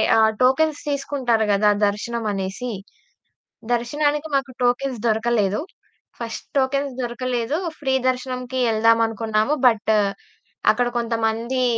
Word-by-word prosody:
ఆహ్, 220 Hz, 0 st, +5 dB
టోకెన్స్ 290 Hz, +4 st, +3 dB
తీసుకుంటారు 260 Hz, -6 st, 0 dB
గదా 210 Hz, +1 st, +4 dB, 0.2 s
దర్శనమనేసి. 210 Hz, +1 st, -3 dB, 1.0 s
దర్శనానికి 290 Hz, +6 st, 0 dB
మాకు 270 Hz, -1 st, 0 dB
టోకెన్స్ 245 Hz, 0 st, +1 dB
దొరకలేదు. 220 Hz, -2 st, +1 dB, 0.6 s
ఫస్ట్ 230 Hz, -1 st, -6 dB
టోకెన్స్ 275 Hz, +1 st, +1 dB
దొరకలేదు, 245 Hz, +2 st, -2 dB, 0.2 s
ఫ్రీ 265 Hz, -2 st, 0 dB
దర్శనంకి 255 Hz, 0 st, -3 dB
యెళ్దామనుకున్నాము, 225 Hz, +2 st, +2 dB
బట్ట్ 220 Hz, -2 st, +3 dB, 0.8 s
అక్కడ 245 Hz, -, 0 dB
కొంతమందీ 230 Hz, +2 st, -1 dB
240 Hz, 90 wpm, -22 LUFS, 225-260 Hz, 1.0 s, ఆహ్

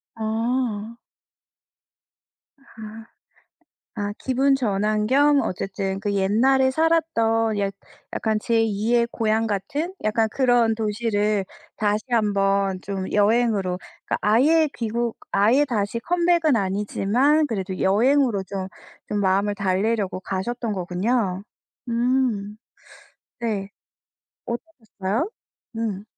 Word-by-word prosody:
아. 225 Hz, 0 st, -2 dB, 1.8 s
아 220 Hz, +1 st, -9 dB, 0.9 s
아 205 Hz, -1 st, -2 dB
기분 270 Hz, +1 st, +2 dB
전환 215 Hz, -3 st, 0 dB
겸 285 Hz, +2 st, +4 dB
어쨌든 195 Hz, +1 st, -3 dB
그 205 Hz, -1 st, -2 dB
옛날에 250 Hz, +7 st, +3 dB
살았던 230 Hz, -9 st, +1 dB
약 200 Hz, -1 st, -1 dB, 0.4 s
약간 220 Hz, -1 st, 0 dB
제 230 Hz, 0 st, +2 dB
2의 225 Hz, +3 st, +1 dB
고향 225 Hz, -1 st, 0 dB
같은 270 Hz, -, -2 dB
약간 220 Hz, +1 st, +2 dB
그런 245 Hz, -3 st, +3 dB
도시를 210 Hz, -2 st, 0 dB, 0.3 s
다시 210 Hz, 0 st, 0 dB
1 220 Hz, -3 st, +2 dB
번 195 Hz, -1 st, +1 dB
좀 190 Hz, -1 st, -4 dB
여행으로 210 Hz, -3 st, +2 dB, 0.3 s
그니까 -, -, 0 dB
아예 295 Hz, +10 st, +4 dB
귀국 235 Hz, 0 st, -2 dB, 0.2 s
아예 225 Hz, +9 st, +4 dB
다시 230 Hz, -4 st, -2 dB
컴백은 340 Hz, -1 st, +2 dB
아니지만 210 Hz, +9 st, +1 dB
그래도 190 Hz, -4 st, -3 dB
여행으로 230 Hz, +1 st, +3 dB
좀, 190 Hz, 0 st, -5 dB, 0.4 s
좀 210 Hz, -, -1 dB
마음을 200 Hz, +1 st, +1 dB
달래려고 200 Hz, 0 st, 0 dB
가셨던 220 Hz, +5 st, -3 dB
거군요. 190 Hz, +2 st, -1 dB, 0.5 s
음. 235 Hz, -4 st, 0 dB, 0.8 s
네. 205 Hz, -4 st, -2 dB, 0.8 s
어떠셨어요? 235 Hz, -, -4 dB, 0.5 s
음. 210 Hz, -4 st, -3 dB
220 Hz, 205 characters per minute, -23 LUFS, 200-245 Hz, 1.8 s, 겸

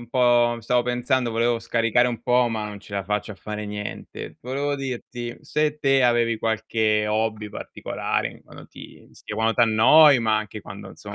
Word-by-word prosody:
un 120 Hz, -, -12 dB
po' 120 Hz, -2 st, +3 dB
stavo 120 Hz, +2 st, +1 dB
pensando 125 Hz, 0 st, 0 dB
volevo 115 Hz, +1 st, +1 dB
scaricare 115 Hz, +1 st, +2 dB
un 115 Hz, -2 st, -5 dB
po' 125 Hz, 0 st, +3 dB
ma 110 Hz, -2 st, -3 dB
non 105 Hz, -1 st, -8 dB
ce 100 Hz, -, -15 dB
la 100 Hz, -, -2 dB
faccio 105 Hz, +2 st, -2 dB
a -, -, -11 dB
fare 105 Hz, +1 st, -6 dB
niente. 105 Hz, 0 st, -7 dB
Volevo 140 Hz, +3 st, -2 dB
dirti 120 Hz, -3 st, -6 dB
se 150 Hz, 0 st, -1 dB
te 135 Hz, -2 st, +3 dB
avevi 120 Hz, -2 st, +2 dB
qualche 110 Hz, -1 st, 0 dB
hobby 110 Hz, 0 st, -1 dB
particolare -, -, -3 dB
in -, -, -17 dB
quando -, -, -14 dB
ti -, -, -14 dB
st -, -, -10 dB
quando 110 Hz, +1 st, 0 dB
t'annoi 125 Hz, +6 st, +6 dB
ma 110 Hz, -2 st, +1 dB
anche 105 Hz, 0 st, -6 dB
quando 100 Hz, +1 st, -10 dB
insomma 100 Hz, -1 st, -10 dB
115 Hz, 185 wpm, -23 LUFS, 110-125 Hz, -, t'annoi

